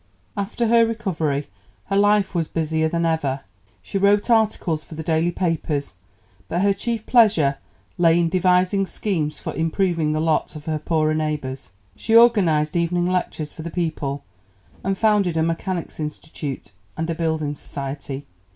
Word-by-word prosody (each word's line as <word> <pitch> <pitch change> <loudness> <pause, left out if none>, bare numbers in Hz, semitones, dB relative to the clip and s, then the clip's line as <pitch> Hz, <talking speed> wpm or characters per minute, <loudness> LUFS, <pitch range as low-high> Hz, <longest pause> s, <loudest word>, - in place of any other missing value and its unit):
After 200 +3 -2
her 230 0 +5
recovery 175 -11 -1 0.4
her 195 - -2
life 205 0 +3
was 165 -3 0
busier 160 0 0
than 170 +1 0
ever. 145 -5 0 0.4
She 195 - -3
wrote 205 +4 +3
articles 210 -8 +2
for 160 - -11
the 160 - -5
daily 160 +1 +1
papers, 165 - -2 0.6
but 175 - 0
her 200 0 +4
chief 225 +2 -3
pleasure 185 - +4 0.4
lay 170 0 +5
in 170 - +2
devising 185 +2 +2
schemes 165 -9 -2
for - - -5
improving 165 -1 0
the 155 - 0
lot 160 0 0
of 150 - -9
her 155 -1 -1
poorer 155 0 +1
neighbours. 150 -6 -3 0.2
She 225 - 0
organized 180 -11 +5
evening 175 +1 +1
lectures 170 -4 -2
for - - -9
the 170 - -5
people, 155 -5 -3 0.6
and 195 0 -1
founded 205 -6 +2
a 160 - +2
Mechanics' 165 +1 -3
Institute 150 -6 -6 0.3
and 160 +1 -2
a 165 - -1
building 160 -3 -1
society. 140 -1 -6
165 Hz, 155 wpm, -22 LUFS, 155-195 Hz, 0.6 s, her